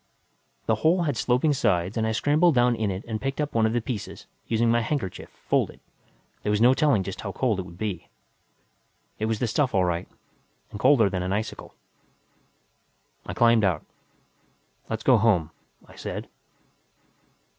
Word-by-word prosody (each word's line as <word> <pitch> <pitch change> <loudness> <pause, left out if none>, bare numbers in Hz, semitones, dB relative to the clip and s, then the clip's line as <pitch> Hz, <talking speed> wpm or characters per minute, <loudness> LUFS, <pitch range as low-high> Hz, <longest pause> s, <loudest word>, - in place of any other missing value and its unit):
The 110 - +2
hole 175 +3 +3
had 145 -5 -1
sloping 125 +6 +2
sides 100 -8 0
and 110 -1 0
I - - 0
scrambled 150 +7 +3
down 120 0 +4
in 110 -2 -1
it 95 +1 -5
and 110 -2 -4
picked 135 +1 -3
up 150 -1 -2
one 110 -1 +3
of 110 - -2
the 120 - +1
pieces, 110 -2 -6 0.2
using 115 0 +2
my 120 0 +3
handkerchief, 115 -6 -3 0.2
folded - - 0 0.6
there - - -3
was 105 0 +2
no 120 +3 +6
telling 135 -8 +2
just 95 0 -6
how 100 - -4
cold 110 -2 0
it 95 - -5
would 85 -1 -13
be. 100 -5 -4 1.1
It 110 - 0
was 110 -1 0
the 125 - -1
stuff, 125 +1 0
all 95 -2 +3
right. 85 0 -2 0.6
And 105 - -7
colder 125 -3 +5
than 95 -2 -2
an 90 +1 -2
icicle. 110 +2 -5 1.5
I - - -5
climbed 115 -2 +4
out. 90 -6 0 1.0
"Let's 110 -1 -3
go 125 -4 +5
home," 90 -8 +2 0.4
I - - -16
said. - - -6
110 Hz, 175 wpm, -25 LUFS, 100-125 Hz, 1.5 s, no